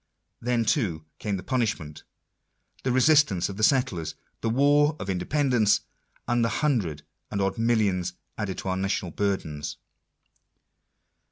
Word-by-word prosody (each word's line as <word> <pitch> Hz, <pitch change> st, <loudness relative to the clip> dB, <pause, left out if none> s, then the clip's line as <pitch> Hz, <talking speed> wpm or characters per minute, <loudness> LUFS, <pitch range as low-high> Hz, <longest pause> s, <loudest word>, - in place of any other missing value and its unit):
Then 120 Hz, -1 st, +1 dB
too 90 Hz, -, 0 dB
came 105 Hz, -2 st, -2 dB
the 90 Hz, -, -7 dB
punishment, 105 Hz, -, -2 dB, 0.8 s
the 130 Hz, -, 0 dB
resistance 130 Hz, -, +4 dB
of 100 Hz, -, -7 dB
the -, -, -4 dB
settlers, 110 Hz, -, +2 dB, 0.3 s
the 115 Hz, -, 0 dB
war 145 Hz, +5 st, +4 dB
of 95 Hz, -, -3 dB
independence, 115 Hz, +3 st, +2 dB, 0.5 s
and 120 Hz, -1 st, +2 dB
the 115 Hz, -, +2 dB, 0.2 s
hundred 90 Hz, -, 0 dB, 0.3 s
and 100 Hz, -, -3 dB
odd 95 Hz, +3 st, 0 dB
millions 105 Hz, -6 st, +1 dB, 0.2 s
added 100 Hz, -3 st, -3 dB
to 95 Hz, -, -4 dB
our 95 Hz, -, 0 dB
national 95 Hz, -2 st, -1 dB
burdens 80 Hz, -8 st, -2 dB
105 Hz, 135 wpm, -26 LUFS, 90-125 Hz, 0.8 s, resistance